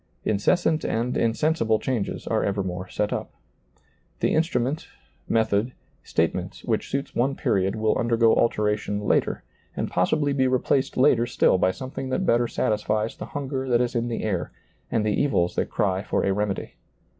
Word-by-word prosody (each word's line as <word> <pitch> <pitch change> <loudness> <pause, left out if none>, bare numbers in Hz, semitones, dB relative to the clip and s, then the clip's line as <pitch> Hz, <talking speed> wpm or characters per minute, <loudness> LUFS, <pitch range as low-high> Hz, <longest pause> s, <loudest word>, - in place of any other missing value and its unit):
Incessant 155 - +2
and 120 +2 -1
insensible 115 -1 +1
changes 115 -3 -3
are - - 0
evermore 95 -2 -2
set 105 - -1
up. - - -4 0.9
The - - +1
instrument, 155 -3 0 0.4
method, 110 +2 +1 0.3
statement - - -2
which - - -1
suits 140 0 -3
one 135 +3 +1
period 95 -4 0
will 110 0 +1
undergo 115 -1 +3
alteration 105 -2 0
later, 105 - +1 0.3
and - - -2
possibly 145 - +1
be 130 -1 +2
replaced 130 +1 +1
later 125 -3 +4
still 95 - +3
by 95 - +3
something 130 +6 -5
that 185 +8 0
better 120 -5 +3
satisfies 110 -2 -1
the - - -7
hunger 135 -2 -3
that 120 -1 +4
is 125 -1 0
in 120 0 0
the 115 - -3
air 95 -5 -2 0.4
and 110 -2 0
the 105 - +1
evils 90 -12 +1
that - - -1
cry 95 -4 0
for - - -1
a 100 - +2
remedy. 105 -1 -2
115 Hz, 160 wpm, -25 LUFS, 105-130 Hz, 0.9 s, later